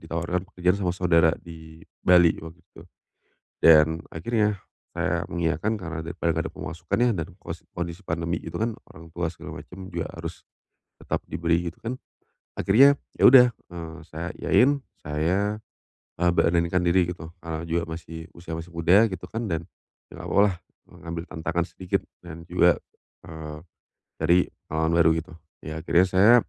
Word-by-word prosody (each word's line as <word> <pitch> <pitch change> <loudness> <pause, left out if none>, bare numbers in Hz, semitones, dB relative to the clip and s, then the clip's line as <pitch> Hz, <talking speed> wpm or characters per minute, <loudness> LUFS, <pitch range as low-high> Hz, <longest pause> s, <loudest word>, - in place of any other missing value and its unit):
ditawarkan 85 +2 -2
pekerjaan 90 +1 +1
sama 90 -2 0
saudara 85 -3 +4
di 80 -1 -12 0.2
Bali, 90 -2 +6
di - - -11
waktu 80 +1 -10
itu. - - -17 0.8
Dan 80 0 +6
akhirnya, 105 +2 0 0.4
saya - - 0
mengiyakan 85 +6 0
karena 85 -4 -5
daripada 85 +1 -2
nggak - - -1
ada - - -26
pemasukan 85 +1 -4
ya, 120 0 +4
dan 80 -3 -3
kos 85 +1 -8
kondisi 85 +2 -5
pandemi 85 0 -2
gitu - - -6
kan, 115 +1 -1 0.2
orang 80 +1 -13
tua 85 -1 -1
segala - - -9
macam 95 +1 -11
juga 85 -1 -2
harus - - -7 0.6
tetap - - -2
diberi 85 0 0
gitu - - -28
kan. 120 +3 -4 0.6
Akhirnya, 135 +8 +6 0.2
ya - - +4
udah, 125 -1 +9
eee, 85 -5 -10
saya 80 +2 -5
iyain, 140 +3 +4 0.2
saya, 90 +8 0 0.6
eee, 90 - +4
beranikan 85 +1 +2
diri 90 0 +3
gitu, 85 -2 -8
eee, 80 -1 -4
juga 85 0 -1
masih 80 0 -8
usia 85 -1 -7
masih 80 +2 -6
muda 95 +7 +5
gitu 95 -2 -6
kan, 115 -1 -4
dan 85 -1 -2 0.5
nggak - - -9
apa-apa 100 - +3
lah, 95 - 0 0.3
e - - -23 0.2
ngambil 85 0 -4
tantangan 85 +1 -2
sedikit, 90 -1 -2 0.2
dan 85 -1 -10
juga, 90 0 +4 0.5
eee, 80 -2 -8 0.6
dari 85 +3 +4 0.3
pengalaman 80 +1 +1
baru 80 - +5
gitu. 90 +3 -7 0.3
Ya 80 +1 -5
akhirnya 85 +2 +4
saya, 95 +6 +6
85 Hz, 165 wpm, -25 LUFS, 80-90 Hz, 0.8 s, udah